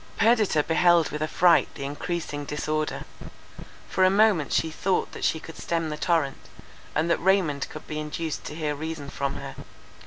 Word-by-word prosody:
Perdita 220 -8 +3
beheld 170 0 +4
with 150 - -4
affright 170 +2 +4
the - - -6
encreasing 145 +1 -4
disorder. 155 +1 -2 0.8
For 190 - +1
a 185 - +7
moment 195 -6 +3
she 160 - +1
thought 185 +4 0
that - - -8
she 160 - +1
could 165 0 -11
stem 165 -2 -1
the - - -2
torrent, 150 -2 -1 0.5
and 155 +2 +2
that - - +2
Raymond 175 -7 +1
could 155 - -9
be 155 -1 -4
induced 155 +1 -4
to - - -6
hear 155 -2 -1
reason 150 -1 -5
from 140 0 -2
her. - - -7
160 Hz, 175 wpm, -26 LUFS, 150-175 Hz, 0.8 s, a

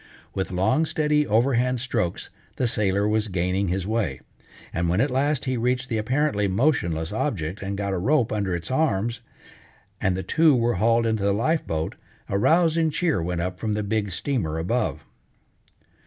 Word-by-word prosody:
With 95 - -2
long, 95 - +1
steady, 150 -1 +1
overhand 125 +3 +2
strokes, 115 -8 -2 0.2
the 125 - 0
sailor 100 -2 +1
was 110 0 +1
gaining 90 +1 0
his 90 +1 -1
way, 105 - -1 0.5
and 85 0 0
when 90 +4 +1
at 135 +3 +2
last 140 +2 +1
he 130 -1 -1
reached 125 +2 0
the 115 -3 0
apparently 115 -2 +1
motionless 95 - +1
object 100 - -2
and 100 0 -3
got 100 -1 -2
a 95 - -1
rope 125 +4 +2
under 100 -4 -1
its 85 +7 -5
arms, 120 -5 0 0.8
and 95 -2 +1
the 95 - -3
two 160 -3 +4
were 120 0 +1
hauled 115 +1 +3
into 110 -2 0
the 100 0 +2
life 155 +9 0
boat, 80 0 -2 0.4
a 100 - 0
rousing 165 - +3
cheer 155 - 0
went 85 0 -2
up 90 +1 -4
from 110 -2 -1
the 105 0 -1
big 105 0 -1
steamer 90 - -2
above. 110 +9 -1
110 Hz, 175 wpm, -24 LUFS, 95-130 Hz, 0.8 s, two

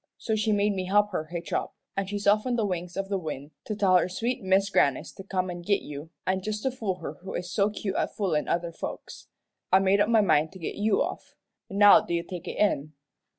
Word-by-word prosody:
So 220 - -1
she 215 0 +1
made 205 0 +2
me 185 -1 -3
help 205 +2 +3
her 155 -4 -2
hitch 170 +1 -6
up, - - -2 0.2
an' 195 -1 -1
she's 205 +1 -4
off 210 +4 +4
on 245 - +1
the 225 -3 +1
wings 180 -2 -4
of 195 0 -2
the 195 -1 -1
wind 150 -3 -6
to 215 - -3
tell 190 -3 +4
her 180 +1 +1
sweet 235 +7 -2
Mis' 195 +1 +2
Grannis 140 -7 +2
to 195 - -10
come 185 -2 -2
an' 175 0 -6
git 200 +3 +1
you; 150 +2 -8 0.2
an' 190 0 0
just 210 +2 -4
to 265 - +1
fool 220 -7 -2
her 155 -2 -6
who 190 - -6
is 180 +1 -4
so 200 +2 +2
cute 210 -1 -4
at - - -1
foolin' 175 -8 0
other 170 0 -1
folks, - - -7 0.4
I 190 - +7
made 195 +1 +3
up 205 - +2
my 225 -2 +5
mind 160 -5 +2
to - - -10
git 165 - -4
you 205 0 +2
off. - - -7 0.3
Now 205 +2 +7
do 190 -5 -3
you 170 - -1
take 175 -1 -8
it - - -5
in?" 155 -7 +1
195 Hz, 250 wpm, -27 LUFS, 175-210 Hz, 0.4 s, I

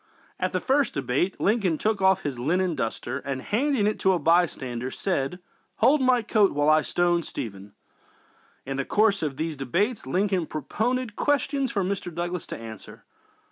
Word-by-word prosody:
| - - -32
| - - -30
| - - -43
At - - 0
the - - 0
first 275 +1 +1
debate 140 +7 -1
Lincoln 195 -6 +2
took 215 +1 0
off 190 0 +4
his 140 -4 -3
linen 175 +7 +1
duster 120 +1 -3
and, 135 -1 -4
handing 245 - 0
it 210 - 0
to 190 - +3
a - - +2
bystander, 140 -8 +1
said: 175 -1 -2 0.4
"Hold 290 +2 +4
my 255 -2 +3
coat 210 -2 +3
while 145 +1 +2
I 155 0 +5
stone 175 +2 +1
Stephen!" 100 - -7 0.9
In 135 0 -4
the 135 - 0
course 205 +5 +2
of 145 -4 -2
these 160 -1 -3
debates 180 - -1
Lincoln 185 +2 0
propounded 225 - -2
questions 280 -1 0
for 200 - 0
Mr. 185 -1 -3
Douglas 175 +1 -4
to - - -6
answer. 110 -2 -10
180 Hz, 180 wpm, -26 LUFS, 140-210 Hz, 0.9 s, I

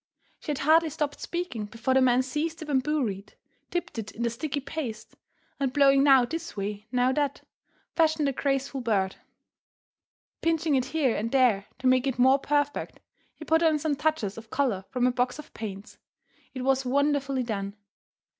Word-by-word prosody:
She - - -10
had 295 - 0
hardly 315 +3 +4
stopped 290 0 -3
speaking 340 -12 -4
before 230 +5 -2
the 265 - +4
man 255 0 +4
seized 305 +5 -3
a - - -8
bamboo 295 +1 +1
reed, 200 -3 -5 0.3
dipped 350 -9 -3
it 210 -2 -5
in 235 - -5
the 235 - +1
sticky 285 +4 -3
paste, 265 -6 -6 0.4
and 270 -2 0
blowing 275 0 +5
now 270 -3 +6
this 325 0 -6
way, 205 +1 -4
now 250 0 +2
that, 285 0 -1 0.5
fashioned 315 -3 +3
the - - +2
graceful 275 0 -1
bird. 200 -5 0 1.2
Pinching 325 -2 +1
it 260 -2 +2
here 270 -3 +1
and 225 +2 -2
there 245 -7 +3
to - - -10
make 255 +1 +4
it 265 - -1
more 260 +2 +5
perfect, 290 0 -1 0.4
he 310 - -10
put 320 +1 +3
on 320 -2 +4
some 300 0 -1
touches 285 -9 -1
of 225 0 -15
colour 240 -9 0
from 250 -1 0
a 250 - +4
box 250 0 -1
of 300 - -11
paints. 200 -2 -8 0.6
It 255 - -4
was 270 0 +2
wonderfully 275 0 +1
done. 200 -3 -4
265 Hz, 180 wpm, -27 LUFS, 235-295 Hz, 1.2 s, now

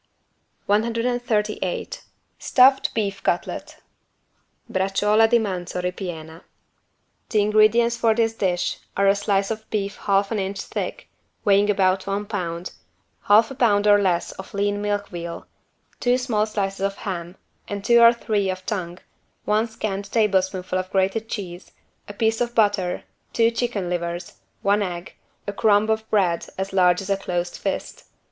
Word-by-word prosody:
138 225 -2 -1 0.4
STUFFED 265 +1 +4
BEEF 200 -3 -2
CUTLET - - -3 0.9
(Braciuola 205 +4 +2
di 240 - +5
manzo 185 -5 -3
ripiena) 175 -3 -5 0.9
The 210 -3 +2
ingredients 215 +3 +4
for 225 -2 +2
this 225 -1 +1
dish 185 -5 -1 0.2
are 200 0 +3
a 195 - +5
slice 200 0 0
of 220 0 -6
beef 200 -1 -2
half 200 0 +1
an 220 - 0
inch 195 +1 -3
thick, - - -5 0.4
weighing 200 +1 +4
about 190 -1 +2
one 200 +1 -2
pound, 180 -4 -4 0.5
half 220 +4 +5
a - - -4
pound 210 -6 +2
or 205 -1 +6
less 175 -3 0
of 190 - -10
lean 205 0 0
milk 205 0 -2
veal, 170 -1 -6 0.5
two 245 0 +2
small 225 -4 0
slices 195 -2 -3
of 195 0 0
ham 175 -2 -4 0.3
and 200 -1 -5
two 235 0 +6
or 235 0 +9
three 210 -4 -1
of 185 0 -4
tongue, 180 -4 -3 0.5
one 215 +2 +2
scant 200 -2 -4
tablespoonful 190 -4 +1
of 185 0 -5
grated 195 +4 0
cheese, 180 -4 -6 0.4
a - - -6
piece 220 +2 0
of 240 0 -1
butter, 205 -5 +1 0.3
two 230 0 +3
chicken 230 -5 -2
livers, 175 0 -4 0.2
one 205 +1 +3
egg, 180 -2 -4 0.3
a 205 - -4
crumb 210 +1 +3
of 220 0 -2
bread 180 -5 +1
as 190 0 -4
large 180 -1 +4
as 195 - -8
a 195 - +2
closed 175 -2 -3
fist. - - -4
205 Hz, 150 wpm, -23 LUFS, 185-220 Hz, 0.9 s, or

